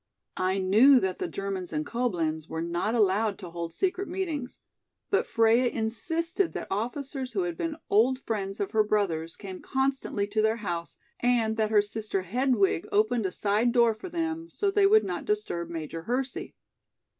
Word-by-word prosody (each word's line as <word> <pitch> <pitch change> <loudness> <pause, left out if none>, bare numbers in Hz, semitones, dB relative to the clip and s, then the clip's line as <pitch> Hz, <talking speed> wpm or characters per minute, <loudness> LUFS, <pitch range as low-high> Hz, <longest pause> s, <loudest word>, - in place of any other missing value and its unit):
I 185 +1 +1
knew 220 +9 +6
that 190 -4 -2
the - - -1
Germans 190 0 -4
in 155 -1 -2
Coblenz 165 -10 -1
were 160 0 -3
not 175 +7 -1
allowed 210 -1 +2
to 180 -4 -9
hold 170 -1 -5
secret 380 - -1
meetings, 325 -9 -4 0.5
but 400 - +2
Freia 230 +2 +4
insisted 330 - -1
that - - -6
officers 255 +5 -3
who 195 -4 0
had 175 -1 -3
been 325 - -3
old 240 +6 +4
friends 200 -5 -4
of 200 - -2
her 220 -1 +4
brother's 175 -6 0
came 190 -3 -8
constantly 265 -6 -1
to 210 +1 0
their 220 +1 +2
house 170 -2 -4 0.2
and 235 -3 +2
that 215 -1 +1
her 210 -2 +4
sister 210 -2 -3
Hedwig 220 -3 +1
opened 215 0 +2
a - - -5
side 210 +5 +1
door 235 -2 +5
for 220 +12 -9
them, 330 -1 -3
so 400 +2 0
they 395 0 +4
would 435 +2 +6
not - - -3
disturb 415 - -2
Major 165 -1 -5
Hersey. 250 +6 -3
220 Hz, 175 wpm, -28 LUFS, 190-265 Hz, 0.5 s, knew